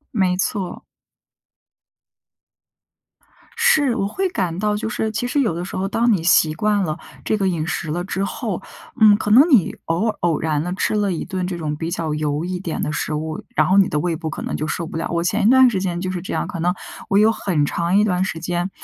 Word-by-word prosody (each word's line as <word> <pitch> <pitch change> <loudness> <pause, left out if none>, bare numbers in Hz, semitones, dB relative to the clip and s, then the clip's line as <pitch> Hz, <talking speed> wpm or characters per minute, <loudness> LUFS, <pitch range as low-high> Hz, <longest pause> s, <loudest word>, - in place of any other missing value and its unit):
没 185 -3 +2
错。 190 -1 -2 2.8
是， 315 - +3
我 195 - 0
会 380 - -1
感 180 - -2
到 210 +1 +1
就 215 +1 -3
是 220 0 -2
其 225 +3 -2
实 285 - 0
有 225 -9 +1
的 175 - -3
时 180 - -7
候， 190 +1 -1
当 230 +3 +2
你 190 - +2
习 165 -2 +4
惯 205 +4 +1
了 155 -3 -2 0.3
这 215 - 0
个 195 - 0
饮 165 -4 -1
食 160 -1 -3
了 175 +3 -2
之 190 +1 -2
后， 200 - -3 0.4
嗯， 215 -1 +7
可 210 -1 -2
能 280 +9 +7
你 235 - +4
偶 170 +7 0
尔 - - -4
偶 170 -3 +1
然 155 -2 0
地 180 +2 -3
吃 205 - 0
了 205 -2 +1
一 165 - -3
顿 185 -1 -3
这 180 -1 -4
种 155 -3 -3
比 160 +2 -4
较 165 -3 -2
油 150 0 -1
一 180 0 -3
点 175 -3 -4
的 - - -1
食 155 +1 -2
物， 155 +1 -4
然 155 - +4
后 190 - +3
你 195 - +6
的 150 - -1
胃 170 +1 -1
部 160 0 -4
可 - - -6
能 - - -3
就 155 - -3
受 170 - -3
不 160 - -6
了。 165 - -2
我 170 0 0
前 180 - +1
一 - - +6
段 260 0 +7
时 200 -5 -1
间 180 -2 -2
就 185 0 -2
是 180 - -4
这 190 - -6
样， - - -1
可 190 -5 -6
能 175 +2 +1 0.4
我 195 - +3
有 215 +2 +5
很 175 -9 0
长 170 +5 0
一 210 - +5
段 185 -3 +1
时 165 -4 -3
间， 175 +2 -2
180 Hz, 260 characters per minute, -21 LUFS, 165-210 Hz, 2.8 s, 嗯